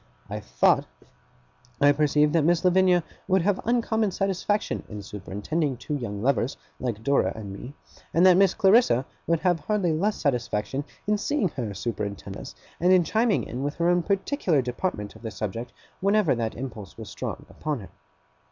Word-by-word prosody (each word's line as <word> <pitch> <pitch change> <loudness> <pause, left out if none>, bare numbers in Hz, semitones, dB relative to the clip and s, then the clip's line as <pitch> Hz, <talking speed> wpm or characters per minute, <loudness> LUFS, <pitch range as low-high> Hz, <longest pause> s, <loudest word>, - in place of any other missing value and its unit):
I - - -3
thought - - +2 0.9
I 145 0 +6
perceived 150 +1 +3
that 165 -3 +3
Miss 170 +3 +2
Lavinia 180 -1 +4 0.2
would 190 -2 +3
have 200 0 +1
uncommon 225 -2 +1
satisfaction 195 +2 -1
in 105 -2 -7
superintending 110 - -3
two 135 - -5
young 110 -7 -4
lovers, 125 -1 +1 0.2
like 115 -4 -3
Dora 140 +3 +2
and 105 -3 -7
me; 125 +8 -9 0.4
and 170 +3 +4
that 185 -1 +8
Miss 195 0 +4
Clarissa 190 - +4 0.2
would 165 -1 +2
have 175 -2 +2
hardly 190 -1 0
less 200 +7 +1
satisfaction 130 0 -1 0.2
in 210 0 +1
seeing 255 -6 0
her 120 -8 -4
superintend 100 -2 -4
us, 135 - -9 0.2
and 180 +2 +4
in 185 -2 +6
chiming 220 +6 +1
in 125 - -5
with 145 +2 -2
her 170 +1 +1
own 175 0 +3
particular 195 - +1
department 120 - -3
of - - -14
the 115 - -4
subject 110 +3 -5 0.3
whenever 200 -3 +3
that 115 -2 -2
impulse 110 -6 -7
was 110 -4 -8
strong - - -5
upon 150 -6 -4
her. 95 - -11
150 Hz, 170 wpm, -26 LUFS, 115-185 Hz, 0.9 s, that